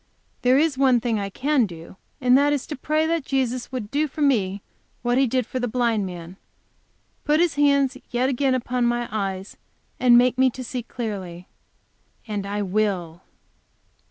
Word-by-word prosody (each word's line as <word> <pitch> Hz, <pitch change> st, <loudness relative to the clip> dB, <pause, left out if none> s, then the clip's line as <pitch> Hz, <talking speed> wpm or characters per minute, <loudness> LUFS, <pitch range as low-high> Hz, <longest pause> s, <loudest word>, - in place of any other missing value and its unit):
There 250 Hz, +1 st, +4 dB
is 295 Hz, -2 st, +1 dB
one 260 Hz, -3 st, +4 dB
thing 230 Hz, -2 st, -1 dB
I 200 Hz, -1 st, -3 dB
can 265 Hz, +2 st, +1 dB
do, 165 Hz, 0 st, -11 dB, 0.2 s
and 250 Hz, -2 st, +4 dB
that 290 Hz, +2 st, +4 dB
is 285 Hz, -, -2 dB
to 300 Hz, -, -5 dB
pray 305 Hz, +4 st, 0 dB
that 330 Hz, -1 st, 0 dB
Jesus 255 Hz, -3 st, -2 dB
would 240 Hz, -5 st, -5 dB
do 300 Hz, +2 st, +1 dB
for 300 Hz, +2 st, -8 dB
me 205 Hz, -8 st, +1 dB, 0.4 s
what 245 Hz, +1 st, +2 dB
He 270 Hz, -, +3 dB
did 255 Hz, 0 st, 0 dB
for 255 Hz, -, -4 dB
the 245 Hz, -, -1 dB
blind 230 Hz, -4 st, 0 dB
man 175 Hz, 0 st, -9 dB, 0.9 s
put 300 Hz, +1 st, +2 dB
His 345 Hz, -1 st, +2 dB
hands 280 Hz, -2 st, +3 dB
yet 245 Hz, +1 st, +1 dB
again 265 Hz, 0 st, +1 dB
upon 250 Hz, -1 st, 0 dB
my 240 Hz, 0 st, -1 dB
eyes 195 Hz, -2 st, -4 dB, 0.4 s
and 245 Hz, -1 st, +6 dB
make 250 Hz, +1 st, +3 dB
me 260 Hz, 0 st, +5 dB
to 255 Hz, +1 st, -7 dB
see 250 Hz, +1 st, -4 dB
clearly. 195 Hz, -7 st, -6 dB, 0.8 s
And 205 Hz, -2 st, -3 dB
I 205 Hz, +1 st, -2 dB
will. 185 Hz, -4 st, -1 dB
245 Hz, 180 wpm, -23 LUFS, 205-270 Hz, 0.9 s, and